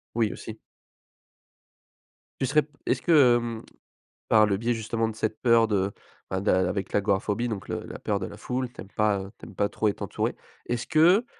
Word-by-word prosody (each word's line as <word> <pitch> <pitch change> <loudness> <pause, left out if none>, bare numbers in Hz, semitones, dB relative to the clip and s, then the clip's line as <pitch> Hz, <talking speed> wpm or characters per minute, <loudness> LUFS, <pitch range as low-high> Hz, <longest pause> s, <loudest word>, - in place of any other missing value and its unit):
Oui, 115 -3 +1
aussi. 110 0 -8 1.8
Tu 135 - +1
serais 150 +3 +3
p 145 - -18 0.2
est-ce - - 0
que, 140 -8 +6
hem, 115 -1 -3 0.7
par 110 -1 +6
le 100 -2 +1
biais, 115 +3 0
justement, 115 0 -1
de 110 - -5
cette 110 0 -2
peur 115 -2 +5
de, 100 -2 0 0.4
enfin, 95 0 -1
d'un 95 -2 +3
avec 95 +1 -3
l'agoraphobie, 105 +3 +1
donc 105 -4 -5
le - - -3
la - - -8
peur 100 -2 -1
de 95 - -3
la - - -9
foule, 125 0 -3
tu - - -10
aimes 95 - -11
pas, 105 -2 +2
heu, 95 +1 -9
tu - - -11
aimes 100 - -12
pas 100 +1 +1
trop 110 - -1
être 100 - -2
entouré, - - -2 0.3
est-ce 120 0 -2
que, 175 +8 +5
110 Hz, 205 wpm, -26 LUFS, 100-120 Hz, 1.8 s, que